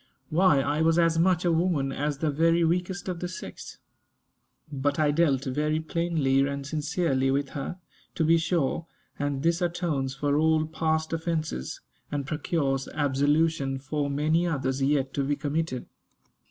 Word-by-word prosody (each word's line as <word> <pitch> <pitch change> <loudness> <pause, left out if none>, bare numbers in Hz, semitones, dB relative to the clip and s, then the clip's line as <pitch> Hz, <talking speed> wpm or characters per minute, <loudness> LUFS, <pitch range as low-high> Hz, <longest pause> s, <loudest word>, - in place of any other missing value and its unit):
Why, 155 -4 +4
I 145 +3 0
was 165 +1 +3
as 165 -1 +3
much 180 0 +3
a 175 - +3
woman 165 -5 +1
as 145 +1 -2
the 155 +1 0
very 165 +3 +3
weakest 180 +3 -1
of 180 -2 -3
the 180 - -3
sex. 185 - -8 0.9
But 145 0 -1
I 150 -2 +3
dealt 145 -4 +2
very 150 +3 0
plainly 160 -4 +1
and 140 0 -4
sincerely 145 -2 0
with 140 0 0
her, 145 +6 -5 0.4
to 160 - +1
be 165 +1 +4
sure; 165 -1 0 0.3
and 145 -1 -2
this 170 +2 +2
atones 165 -7 -1
for 145 +1 0
all 160 0 +3
past 160 0 -1
offences, 160 - -3 0.3
and 145 -2 -2
procures 140 -2 -1
absolution 145 0 +1
for 145 +2 -2
many 155 +5 +1
others 135 -4 -1
yet 135 -1 +1
to 140 - 0
be 145 +2 0
committed. 145 -2 -2
150 Hz, 155 wpm, -27 LUFS, 140-165 Hz, 0.9 s, Why